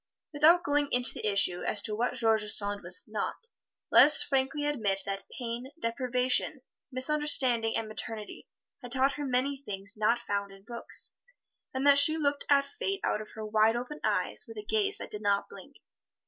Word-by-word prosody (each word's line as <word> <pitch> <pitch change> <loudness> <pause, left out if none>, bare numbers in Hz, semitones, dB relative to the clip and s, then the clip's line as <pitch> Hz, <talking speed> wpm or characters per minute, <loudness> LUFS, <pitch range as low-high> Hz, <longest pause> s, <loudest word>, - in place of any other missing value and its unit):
Without 325 +4 +4
going 290 0 0
into 245 0 +5
the - - -4
issue 185 -3 +1
as 210 - -1
to 215 - -3
what 240 +4 -2
George 225 -3 +3
Sand 205 -1 +4
was 455 - -3
not, - - -5 0.5
let - - +8
us 300 - +4
frankly 275 +2 -1
admit 215 -10 0
that 195 -1 -6
pain, 245 +1 -6
deprivation, 255 +3 -1 0.3
misunderstanding 255 -4 +2
and 225 - -4
maternity 215 0 -7 0.3
had 245 -2 -10
taught 265 +1 +2
her 290 +1 -5
many 265 +2 -1
things 200 -3 -3
not 220 +3 +1
found 200 -3 -4
in 195 0 -16
books, 235 +2 -3 0.6
and 260 +1 -3
that 280 0 +6
she 310 +3 +6
looked 285 -2 -1
at 280 -1 +4
Fate 390 +7 -4
out 210 - -1
of 215 - -11
her 220 -1 -6
wide 215 +1 +2
open 250 +5 -6
eyes - - -1
with 455 - -11
a 420 - -7
gaze 410 -1 0
that - - -9
did 210 - -4
not 200 -1 0
blink. - - -14
250 Hz, 185 wpm, -29 LUFS, 215-285 Hz, 0.6 s, let